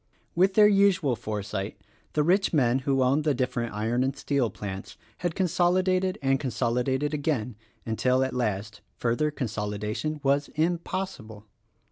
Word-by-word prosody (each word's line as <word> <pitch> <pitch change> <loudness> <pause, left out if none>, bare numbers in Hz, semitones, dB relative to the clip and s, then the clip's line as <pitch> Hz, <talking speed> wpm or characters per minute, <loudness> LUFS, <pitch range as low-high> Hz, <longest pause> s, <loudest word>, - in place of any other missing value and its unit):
With 190 +2 +3
their 210 -1 +8
usual 195 -9 +3
foresight 105 -2 -4 0.3
the 150 - +2
rich 190 +5 +2
men 130 -4 +3
who 135 0 +1
owned 135 +4 +2
the 150 -2 +1
different 120 -3 -2
Iron 115 +4 0
and 135 +1 -2
Steel 140 -5 0
plants 95 -2 -7 0.2
had 175 -2 -2
consolidated 185 +1 +2
and 135 0 +2
con 135 - -2
solidated 130 +5 0
again, 140 -7 -1 0.3
until 125 +3 +1
at 130 -1 -2
last, 105 -4 -2 0.2
further 120 +6 +1
consolidation 110 +2 -3
was 140 +1 +2
impossible. 165 - -2
135 Hz, 140 wpm, -27 LUFS, 115-160 Hz, 0.3 s, their